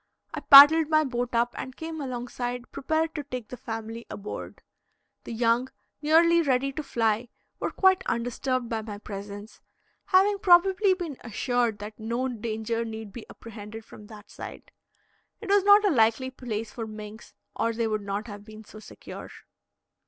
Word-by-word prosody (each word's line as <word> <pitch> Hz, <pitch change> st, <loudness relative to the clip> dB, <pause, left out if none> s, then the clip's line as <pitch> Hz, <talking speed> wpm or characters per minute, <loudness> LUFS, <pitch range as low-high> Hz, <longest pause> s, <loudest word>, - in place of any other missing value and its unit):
I -, -, -3 dB
paddled 300 Hz, +3 st, +9 dB
my 310 Hz, 0 st, +4 dB
boat 245 Hz, -3 st, -3 dB
up 235 Hz, +1 st, +1 dB
and 260 Hz, 0 st, -7 dB
came 320 Hz, -1 st, -6 dB
alongside 245 Hz, -1 st, -5 dB
prepared 315 Hz, +3 st, -1 dB
to 295 Hz, -, -4 dB
take 250 Hz, -5 st, -7 dB
the -, -, -6 dB
family 225 Hz, -1 st, -7 dB
aboard. 205 Hz, -, -8 dB, 0.6 s
The -, -, -7 dB
young, 235 Hz, +2 st, +1 dB, 0.3 s
nearly 335 Hz, +3 st, +4 dB
ready 275 Hz, -2 st, +1 dB
to 310 Hz, -, -5 dB
fly, 230 Hz, -4 st, -1 dB, 0.3 s
were -, -, -1 dB
quite 380 Hz, -1 st, +3 dB
undisturbed 245 Hz, +1 st, -2 dB
by 225 Hz, -1 st, -3 dB
my 210 Hz, -2 st, -7 dB
presence, 205 Hz, +1 st, -9 dB, 0.4 s
having 395 Hz, +2 st, +3 dB
probably 380 Hz, +1 st, +4 dB
been 335 Hz, -7 st, -6 dB
assured 240 Hz, -1 st, -1 dB
that 210 Hz, +2 st, -9 dB
no 235 Hz, +4 st, -2 dB
danger 230 Hz, -1 st, -3 dB
need 220 Hz, -2 st, -7 dB
be 235 Hz, -, -9 dB
apprehended 220 Hz, 0 st, -10 dB
from 210 Hz, -2 st, -14 dB
that 210 Hz, -1 st, -14 dB
side. -, -, -10 dB, 0.7 s
It 420 Hz, -, -9 dB
was 400 Hz, -1 st, +4 dB
not 410 Hz, +1 st, +6 dB
a 400 Hz, -, +3 dB
likely 230 Hz, 0 st, +2 dB
place 225 Hz, -4 st, -5 dB
for 225 Hz, -2 st, -6 dB
minks, 215 Hz, +1 st, -10 dB, 0.2 s
or 230 Hz, -, 0 dB
they 230 Hz, 0 st, -2 dB
would 215 Hz, -1 st, -1 dB
not 200 Hz, +1 st, -4 dB
have 205 Hz, -3 st, -9 dB
been 215 Hz, 0 st, -12 dB
so 215 Hz, -, -13 dB
secure. -, -, -10 dB
240 Hz, 165 wpm, -26 LUFS, 220-290 Hz, 0.7 s, paddled